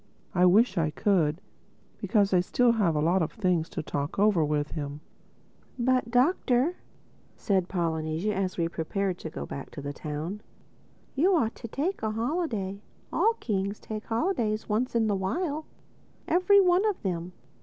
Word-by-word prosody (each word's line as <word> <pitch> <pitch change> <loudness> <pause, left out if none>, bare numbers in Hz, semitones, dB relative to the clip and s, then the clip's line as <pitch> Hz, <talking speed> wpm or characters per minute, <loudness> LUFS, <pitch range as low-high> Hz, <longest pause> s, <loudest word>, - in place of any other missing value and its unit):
I 180 0 +5
wish 200 +1 +4
I 155 -2 +1
could, 165 -2 +1 0.6
because 200 -4 +2
I 180 - +5
still 240 +7 +3
have 200 -8 +1
a 150 - +1
lot 175 +4 +2
of 160 - -1
things 180 -6 0
to - - -4
talk 145 0 -3
over 200 -5 +4
with 150 0 -1
him." 145 -1 -5 0.8
"But 250 -1 +1
Doctor," 260 +3 +2 0.6
said 190 -4 +1
Polynesia 165 +2 -1
as 190 -1 -2
we 170 -1 +1
prepared 180 +3 -2
to 160 - -6
go - - -6
back 140 - -7
to - - -9
the 145 +1 -5
town, 155 +8 -5 0.7
"you 360 +8 +3
ought 230 -8 +1
to 230 - -8
take 310 - -2
a 220 - 0
holiday. 225 - -2 0.3
All 450 +1 +3
Kings 200 -2 -2
take 215 -1 -6
holidays 225 - -1
once 235 +4 -1
in 230 -1 +3
the 210 - +1
while—every 330 - 0
one 365 0 +4
of 410 - -3
them. 180 -2 -3
200 Hz, 160 wpm, -28 LUFS, 170-245 Hz, 0.8 s, I